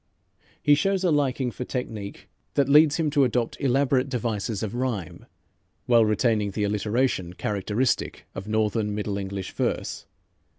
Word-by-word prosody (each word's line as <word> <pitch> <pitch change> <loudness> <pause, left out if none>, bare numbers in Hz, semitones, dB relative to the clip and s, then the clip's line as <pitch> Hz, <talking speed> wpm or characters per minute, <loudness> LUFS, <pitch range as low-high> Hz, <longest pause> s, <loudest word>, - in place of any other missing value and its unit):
He 145 - +6
shows 190 +6 +1
a 180 - +3
liking 135 -4 +1
for 125 - -5
technique 110 -6 -5 0.3
that 140 -2 +3
leads 150 +1 +6
him 160 -3 0
to 145 -1 +4
adopt 120 -2 -1
elaborate 135 0 +2
devices 115 -4 -2
of 110 0 -3
rhyme, 120 -9 -3 0.6
while 115 -2 +5
retaining 105 -1 +1
the 105 +2 -2
alliteration 105 -2 0
characteristic 105 +6 -1
of 95 - -7
Northern 110 -1 0
Middle 105 -1 -2
English 95 -1 -5
verse. - - -3
115 Hz, 140 wpm, -25 LUFS, 105-135 Hz, 0.6 s, He